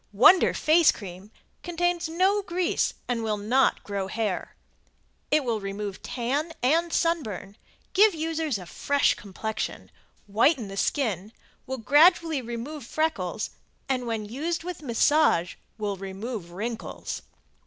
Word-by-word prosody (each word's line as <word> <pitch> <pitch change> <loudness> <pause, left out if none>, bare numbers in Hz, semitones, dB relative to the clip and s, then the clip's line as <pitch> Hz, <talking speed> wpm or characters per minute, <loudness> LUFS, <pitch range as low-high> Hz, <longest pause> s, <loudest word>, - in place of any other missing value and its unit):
Wonder 270 - +6
Face 320 +1 +5
Cream 190 0 -9 0.3
contains 350 -1 -1
no 380 +5 +2
grease 360 -2 0
and 240 -2 -1
will 215 -2 -1
not 240 +6 +2
grow 200 -2 -3
hair. 210 -2 -3 0.7
It 300 -1 +3
will 230 -4 -1
remove 195 0 -5
tan 280 +7 -2
and 330 +6 +3
sunburn, 220 - -1 0.4
give 410 +1 +6
the - - -8
user 320 0 -1
a 180 - -9
fresh 285 - +2
complexion, 220 +2 -5 0.3
whiten 225 +3 +2
the 195 - -7
skin, 210 - 0 0.4
will 265 0 -3
gradually 310 - +4
remove 240 +5 -6
freckles 310 +6 -2 0.4
and 255 -3 -1
when 225 -2 -2
used 310 +10 -3
with 355 -2 -6
massage 260 - +3 0.2
will 205 -2 -2
remove 195 0 -6
wrinkles. 220 +6 -5
250 Hz, 130 wpm, -26 LUFS, 210-320 Hz, 0.7 s, Wonder